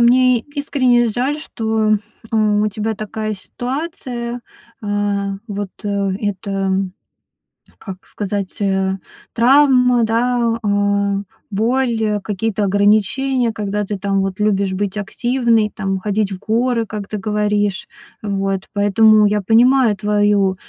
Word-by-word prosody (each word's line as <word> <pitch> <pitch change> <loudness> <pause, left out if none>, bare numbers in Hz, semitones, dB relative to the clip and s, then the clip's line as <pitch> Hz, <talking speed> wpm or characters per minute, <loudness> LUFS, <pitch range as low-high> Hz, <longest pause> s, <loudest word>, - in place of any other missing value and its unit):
мне 250 0 +5
искренне 260 -3 +1
жаль, 255 +7 -1
что, 220 -6 0 0.4
а, 225 - 0
у 210 -1 +2
тебя 215 +2 -3
такая 215 +1 -4
ситуация. 245 - -5 0.4
А 205 -1 -1
вот, 205 -1 -4
э 200 -1 -1
это, 195 -1 -2 1.1
как 190 -2 -9
сказать, 200 -2 -4
э, 190 -1 0 0.4
травма, 250 -1 +4
да, 235 +1 +1
а, 200 -1 +1 0.3
боль, 230 +2 0
э, 210 -1 0
какие-то 210 +1 -2
ограничения, 215 +6 +2
когда 210 -1 -2
ты, 205 +1 -4
там, 195 0 0
вот, 195 0 -3
любишь 200 -2 +1
быть 200 +1 -2
активной, 230 +1 +1
там, 195 -2 -2
ходить 205 +1 -1
в 185 - -5
горы, 230 +2 0
как 210 -1 -6
ты 215 - -4
говоришь. 205 -1 -1 0.3
А 210 - -7
вот, 195 -1 -1
поэтому 210 +1 +5
я 210 0 +1
понимаю 235 +3 +4
твою, 205 -1 +2
210 Hz, 125 wpm, -18 LUFS, 200-235 Hz, 1.1 s, мне